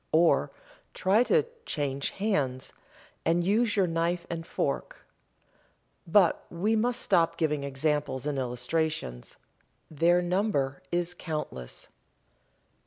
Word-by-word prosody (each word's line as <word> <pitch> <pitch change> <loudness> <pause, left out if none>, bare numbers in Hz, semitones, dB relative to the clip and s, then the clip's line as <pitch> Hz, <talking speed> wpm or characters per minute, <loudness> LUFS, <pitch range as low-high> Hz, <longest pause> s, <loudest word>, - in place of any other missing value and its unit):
Or, 165 +2 +4 0.5
try 200 +4 +3
to 465 - +3 0.2
"change 140 -2 -1
hands" 145 -12 -1 0.5
and 170 +1 +2
use 215 +4 +2
your 195 -3 +4
knife 170 +1 -1
and 165 0 -5
fork. - - -3 1.0
But 180 0 +4
we 205 +6 0
must 235 +2 +1
stop 170 -4 +2
giving 150 -3 0
examples 140 -1 -1
and 145 -2 -1
illustrations. 125 - -2 0.5
Their 170 +3 +3
number 175 -7 0
is 175 0 0
countless. 150 - -5
165 Hz, 105 wpm, -28 LUFS, 140-185 Hz, 1.0 s, Or